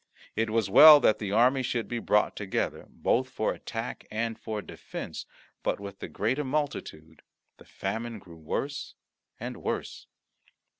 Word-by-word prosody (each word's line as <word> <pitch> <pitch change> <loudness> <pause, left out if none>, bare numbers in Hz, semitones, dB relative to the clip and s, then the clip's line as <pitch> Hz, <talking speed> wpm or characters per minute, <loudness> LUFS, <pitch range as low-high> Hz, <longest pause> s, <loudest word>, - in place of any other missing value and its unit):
It 110 +1 0
was 110 0 +1
well 150 +9 +10
that 110 - +4
the 105 -2 -3
army 125 +5 +4
should 120 -2 -2
be 120 - -3
brought 105 -2 +2
together, 100 -2 -3
both 130 +2 0
for 120 -4 -1
attack 115 +1 -6
and 115 +1 -2
for 110 -2 -4
defence, - - -7 0.3
but - - -1
with 100 -1 -8
the - - -6
greater 125 +9 -1
multitude 140 - -4 0.4
the - - -16
famine 115 +4 -4
grew 85 -4 -14
worse 140 - -4 0.4
and - - -5
worse. - - -4
115 Hz, 150 wpm, -28 LUFS, 105-130 Hz, 0.4 s, well